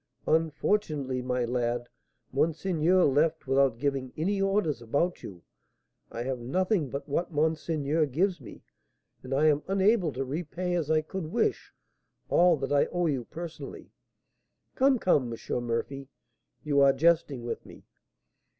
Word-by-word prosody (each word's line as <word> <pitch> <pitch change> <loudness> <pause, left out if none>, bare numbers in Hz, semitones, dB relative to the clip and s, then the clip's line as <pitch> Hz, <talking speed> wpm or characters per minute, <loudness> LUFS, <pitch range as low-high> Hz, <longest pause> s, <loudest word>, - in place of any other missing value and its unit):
"Unfortunately, 155 -4 0
my 125 -1 -1
lad, 120 0 -1 0.5
monseigneur 165 +4 +2
left 155 +4 +2
without 135 -2 +2
giving 135 -1 -2
any 195 +5 0
orders 195 - +1
about 145 +10 -1
you. 90 -4 -10 0.7
I 120 - -4
have 130 0 -3
nothing 175 - 0
but 140 +3 -5
what 170 +5 -1
monseigneur 155 0 0
gives 175 +4 0
me, 120 - -12 0.6
and 130 - -10
I 140 +3 +2
am 150 -1 +4
unable 195 -2 +2
to 135 +2 -3
repay 175 +5 -3
as 165 -4 -1
I 155 0 +3
could 175 +1 -5
wish 235 +2 0 0.6
all 175 -2 +5
that 135 0 -4
I 140 - +3
owe 175 0 -1
you 135 -7 -1
personally." 170 +3 -8 0.8
"Come, 265 0 +3
come, 145 - +2
M. 120 +1 -4
Murphy, 135 +4 -3 0.6
you 145 -2 +2
are 140 -1 +6
jesting 145 -4 +2
with 120 - -4
me." - - -14
150 Hz, 140 wpm, -28 LUFS, 135-175 Hz, 0.8 s, are